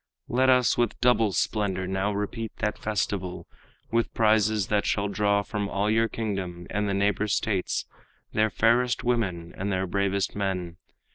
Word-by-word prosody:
Let 130 +2 +2
us 125 -2 +4
with 120 - 0
double 115 -4 +3
splendor 95 0 0
now 95 +2 -1
repeat 105 +2 -3
That 105 -1 -2
festival, 95 -3 -2 0.5
with 115 0 +1
prizes 110 -2 +3
that 105 -1 +2
shall 100 0 +1
draw 100 0 +1
From 100 -1 -3
all 105 +2 0
your 115 +1 +3
kingdom 95 -6 -4
and 105 +1 0
the 100 - 0
neighbor 100 +1 +1
states 100 -1 0 0.5
Their 110 0 +3
fairest 120 +4 +2
women 95 -9 -1
and 100 +2 -3
their 95 0 0
bravest 100 +1 -1
men. 90 -4 -2
105 Hz, 155 wpm, -26 LUFS, 95-110 Hz, 0.5 s, us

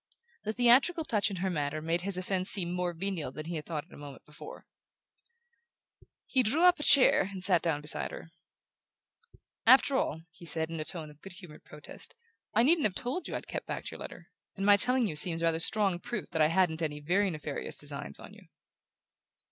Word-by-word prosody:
The 215 - -2
theatrical 255 +8 +3
touch 210 -5 0
in 200 - -5
her - - 0
manner 150 -2 -3
made 165 +2 -2
his 195 0 +3
offense 185 +1 0
seem 175 -4 +5
more 180 0 -2
venial 175 -4 -4
than 155 +3 -8
he 170 +1 -5
had 150 - -8
thought 155 -3 -4
it 170 - -21
a - - -12
moment 145 -2 -12
before. 150 - -12 1.6
He 260 - +2
drew 270 +9 +1
up 360 -2 +5
a - - -4
chair 255 -10 +5
and 190 -2 -5
sat 180 -3 +3
down 160 -4 -1
beside 150 - -1
her. 165 - -11 1.4
"After 265 +2 +6
all," 160 - -1
he 175 - -17
said, 160 +1 -1
in 165 - -5
a 155 - -4
tone 160 -3 -5
of 150 - -21
good 195 - -11
humoured 180 -5 -14
protest, 150 0 -9 0.4
"I 230 - +2
needn't 310 -1 +4
have 190 - -10
told 255 +9 -4
you - - -5
I'd - - -6
kept - - -7
back - - -5
your - - -10
letter; - - -11 0.2
and 195 - -4
my 205 0 +7
telling 250 +4 +3
you 170 -8 -4
seems 165 +2 +1
rather 165 -1 +1
strong 195 0 +1
proof 215 +2 -6
that 160 -2 -1
I 155 - +5
hadn't 165 -1 +1
any 150 -2 -3
very 185 +7 0
nefarious 150 -4 -5
designs 140 - -2
on - - -13
you." - - -17
180 Hz, 210 wpm, -29 LUFS, 155-205 Hz, 1.6 s, my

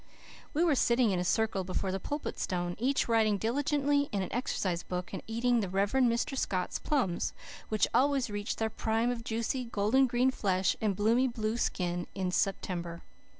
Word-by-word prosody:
We 320 - +3
were 335 -3 +4
sitting 235 -3 +3
in 185 - 0
a - - 0
circle 205 +1 +1
before 185 +1 -2
the 190 - -2
Pulpit 290 +9 -4
Stone, 175 -1 -2
each 265 +4 +1
writing 220 -3 +3
diligently 285 +5 +1
in 200 -3 0
an 185 - -6
exercise 185 -8 -1
book, 180 +1 -5
and 190 - -4
eating 235 +2 +1
the 200 -4 -2
Rev. 195 +2 +1
Mr. 255 +2 +2
Scott's 185 -8 -1
plums, 245 - 0 0.4
which 215 -1 +2
always 275 -1 +3
reached 205 -1 -3
their 220 0 -1
prime 225 +3 0
of 235 -2 -4
juicy, 230 +3 -2
golden 230 +4 +2
green 245 +2 +2
flesh 190 -6 +1
and 210 -3 +1
bloomy 230 +6 +3
blue 225 -2 -2
skin 175 -6 -1
in 185 -2 -1
September. 175 -3 -2
220 Hz, 180 wpm, -31 LUFS, 190-250 Hz, 0.4 s, were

